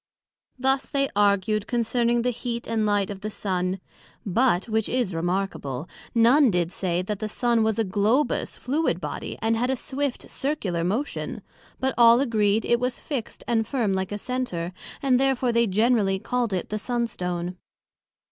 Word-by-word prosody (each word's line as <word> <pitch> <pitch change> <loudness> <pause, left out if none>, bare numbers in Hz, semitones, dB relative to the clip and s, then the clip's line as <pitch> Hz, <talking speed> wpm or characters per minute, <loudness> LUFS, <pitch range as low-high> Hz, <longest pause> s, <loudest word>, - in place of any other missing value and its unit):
Thus 265 +1 +1
they 275 -1 +1
argued 205 +1 +2
concerning 235 0 +1
the 250 - +2
heat 235 0 -4
and 220 -2 0
light 205 -1 +1
of 195 -1 -7
the 215 - -3
Sun; 185 -2 -2 0.5
but, 205 -1 +2
which 220 -1 0
is 245 -7 0
remarkable, 165 -5 -2 0.3
none 245 +4 +6
did 175 -3 0
say, 180 -2 -1
that 205 +1 -3
the 215 - -3
Sun 235 +1 +1
was 220 -1 +1
a 225 - +2
Globous 215 +8 +1
fluid 275 - 0
body, 150 -4 -5
and 225 0 +2
had 245 +3 0
a 265 - +2
swift 270 +1 -3
Circular 210 - -2
motion; 220 +12 -2 0.4
but 265 0 0
all 235 0 +8
agreed, 220 -5 +2
It 235 - +3
was 250 0 -2
fixt 265 -7 -5
and 225 -2 +1
firm 235 -8 0
like 190 0 -2
a 205 - -2
Center, 205 -8 -3 0.3
and 255 -2 +4
therefore 265 -2 +2
they 235 0 +3
generally 210 -1 +2
called 240 +3 -1
it 185 -2 -2
the 215 - -2
Sun 240 +2 -1
stone. 180 -4 -4
225 Hz, 170 wpm, -25 LUFS, 195-245 Hz, 0.5 s, all